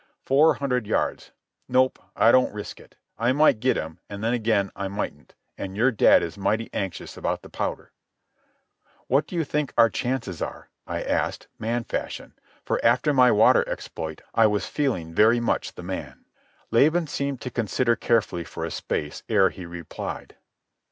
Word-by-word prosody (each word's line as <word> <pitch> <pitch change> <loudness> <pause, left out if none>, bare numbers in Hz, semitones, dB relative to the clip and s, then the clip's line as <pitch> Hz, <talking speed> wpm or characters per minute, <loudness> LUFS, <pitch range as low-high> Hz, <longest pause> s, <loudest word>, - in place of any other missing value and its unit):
"Four 145 +4 +5
hundred 125 -6 -1
yards. - - -1 0.4
Nope, 130 +1 +3 0.2
I 115 - +5
don't 130 +1 +4
risk 105 0 -7
it. - - -18 0.2
I 120 +3 +2
might 145 -5 +4
get 130 +3 +2
him, 80 +1 -5
and 100 +1 -7
then 115 +2 +1
again 110 -4 +1
I 100 - -3
mightn't, 95 -8 -6 0.2
an' 95 0 -5
your 120 +6 +3
dad 110 - +5
is 85 +4 -6
mighty 110 +3 0
anxious 95 -3 -4
about - - -2
the - - -13
powder." - - -4 1.1
"What 140 +4 +2
do - - -7
you 165 - +1
think 150 -1 -2
our 115 -1 +6
chances 125 -9 -3
are?" - - -6 0.2
I - - -3
asked, - - -2
man 115 +2 -1
fashion, - - -5 0.3
for, - - -1
after 150 - +3
my 125 -2 +6
water 110 +1 +5
exploit, 80 -1 -6
I 115 -1 +5
was 105 -1 0
feeling 105 - -2
very 110 +6 +5
much 120 - -1
the - - -9
man. - - -6 0.5
Laban 155 +9 +4
seemed 140 -3 -3
to 125 - -5
consider 115 +1 +1
carefully 105 -9 0
for - - -6
a - - -5
space 75 - -3
ere 95 -1 +4
he 90 -2 -9
replied. 85 -2 -7
115 Hz, 170 wpm, -25 LUFS, 100-130 Hz, 1.1 s, our